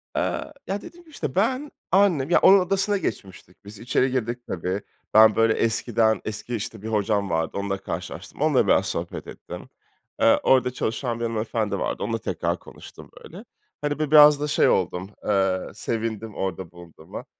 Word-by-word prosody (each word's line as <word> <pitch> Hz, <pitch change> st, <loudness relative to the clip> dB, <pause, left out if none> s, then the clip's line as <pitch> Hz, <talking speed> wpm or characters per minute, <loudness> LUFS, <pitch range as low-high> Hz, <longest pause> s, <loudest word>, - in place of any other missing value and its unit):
Eee, 305 Hz, -, -2 dB
ya, 200 Hz, +2 st, -3 dB
dediğim 345 Hz, 0 st, -13 dB
gibi, 320 Hz, -, -21 dB
işte, 150 Hz, -, -5 dB
ben, 255 Hz, +8 st, 0 dB, 0.2 s
annem, 180 Hz, -8 st, +3 dB
ya, 175 Hz, -, +5 dB
onun 195 Hz, 0 st, +7 dB
odasına 195 Hz, +3 st, 0 dB
geçmiştik 95 Hz, -, -7 dB
biz. 100 Hz, 0 st, -11 dB
İçeri 125 Hz, +2 st, +1 dB
girdik 120 Hz, -1 st, -2 dB
tabii. 90 Hz, +3 st, -3 dB, 0.3 s
Ben, 110 Hz, -1 st, +7 dB
böyle, 115 Hz, 0 st, +3 dB
eskiden 115 Hz, -1 st, +1 dB
eski, 110 Hz, +3 st, -4 dB
işte, 110 Hz, 0 st, -5 dB
bir 110 Hz, -, -7 dB
hocam 105 Hz, -2 st, 0 dB
vardı, 80 Hz, 0 st, -1 dB
onunla 100 Hz, -1 st, -2 dB
karşılaştım. 95 Hz, -, -7 dB
Onunla -, -, +3 dB
biraz -, -, +3 dB
sohbet -, -, -5 dB
ettim. -, -, -10 dB, 0.5 s
Eee, -, -, +5 dB
orada 125 Hz, -1 st, +3 dB
çalışan 120 Hz, 0 st, -3 dB
bir -, -, -3 dB
hanımefendi 110 Hz, -3 st, -2 dB
vardı, -, -, -3 dB
onunla -, -, -1 dB
tekrar -, -, -2 dB
konuştum, -, -, -13 dB
böyle. -, -, -11 dB, 0.4 s
Hani, 145 Hz, 0 st, -2 dB
bi 150 Hz, -2 st, -2 dB
biraz 150 Hz, -1 st, +8 dB
da 150 Hz, -, -1 dB
şey 150 Hz, -, +3 dB
oldum, 90 Hz, +1 st, -1 dB, 0.2 s
eee, 95 Hz, -2 st, +2 dB
sevindim 110 Hz, -1 st, -4 dB
orada 95 Hz, -2 st, -4 dB
bulunduğuma. 85 Hz, -2 st, -11 dB
115 Hz, 170 wpm, -24 LUFS, 100-145 Hz, 0.5 s, biraz